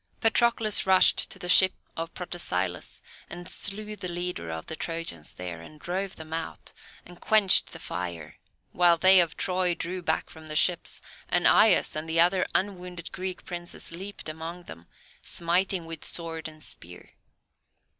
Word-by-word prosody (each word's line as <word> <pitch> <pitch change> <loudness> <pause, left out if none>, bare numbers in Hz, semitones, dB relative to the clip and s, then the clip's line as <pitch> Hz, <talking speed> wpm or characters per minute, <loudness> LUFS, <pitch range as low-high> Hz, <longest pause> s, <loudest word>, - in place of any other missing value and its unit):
Patroclus 225 -3 +2
rushed 190 -1 +5
to - - -7
the 180 - -7
ship 185 +1 +7 0.2
of 165 +1 -4
Protesilaus, 90 - -3 0.3
and 175 +1 -7
slew 210 +1 -3
the 185 - -6
leader 175 - -4
of 80 0 -5
the 160 - -5
Trojans 165 - -4
there, 90 -2 -7
and 150 - -13
drove 190 +4 -3
them 160 0 -9
out, 165 0 -5 0.3
and 175 0 -14
quenched 215 -3 +5
the - - -7
fire; 85 -3 -6 0.3
while 175 -1 +4
they 185 +2 +7
of 170 -3 +2
Troy 180 -2 +1
drew 180 +2 -4
back 160 -2 -1
from 160 0 -12
the 155 - -6
ships, 175 +2 +1 0.3
and - - +2
Aias 215 -5 +5
and 155 +1 -4
the 165 +1 +1
other 180 +2 +4
unwounded 180 -3 -2
Greek 185 0 -5
princes 175 -1 -5
leaped 190 +3 -8
among 165 +3 -6
them, 85 - -12 0.3
smiting 175 +1 0
with 165 -1 -8
sword 165 -1 -2
and 155 -1 -11
spear. 90 +1 -8
175 Hz, 160 wpm, -27 LUFS, 160-185 Hz, 0.3 s, ship